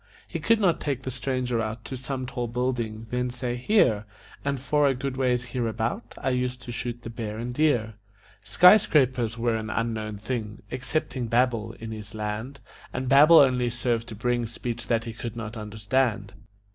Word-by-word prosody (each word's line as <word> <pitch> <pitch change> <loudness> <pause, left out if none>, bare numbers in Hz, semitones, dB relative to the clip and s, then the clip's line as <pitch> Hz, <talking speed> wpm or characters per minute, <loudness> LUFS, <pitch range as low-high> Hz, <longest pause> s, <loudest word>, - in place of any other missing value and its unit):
He - - -4
could 230 -1 +3
not 180 -6 +3
take 135 -3 -2
the 130 - -3
stranger 125 -2 -1
out 110 0 -4
To 130 - -5
some 130 0 -4
tall 125 -1 -3
building, 115 -2 -2
then 125 0 0
say: 125 0 -3
"Here, 125 - +3 0.4
An' 140 0 0
for 145 +2 +2
a 135 - +2
good 135 +1 -3
ways 125 -2 0
hereabout, 115 -2 -2
I 130 - -1
used 125 0 -1
to 120 - -6
shoot 120 0 -5
the 115 - -6
bear 110 -2 -5
and 120 +2 -4
deer." 125 -7 +2 0.5
Skyscrapers 130 - +5
were 115 0 +1
an 110 -1 -3
unknown 110 -2 -2
thing, 105 -1 -4
Excepting 130 -1 -2
Babel, 115 -2 +1
in 115 -1 -8
his 105 -1 -8
land, 110 +6 -4 0.3
And 125 0 -3
Babel 150 +5 +8
only 125 -4 +5
served 120 -1 -1
to 110 - -7
bring 120 +2 0
Speech 120 +1 -5
that 115 -1 +1
he 115 -1 -6
could 115 +1 -6
not 115 -1 -6
understand. 110 0 -1
120 Hz, 180 wpm, -26 LUFS, 110-130 Hz, 0.5 s, Babel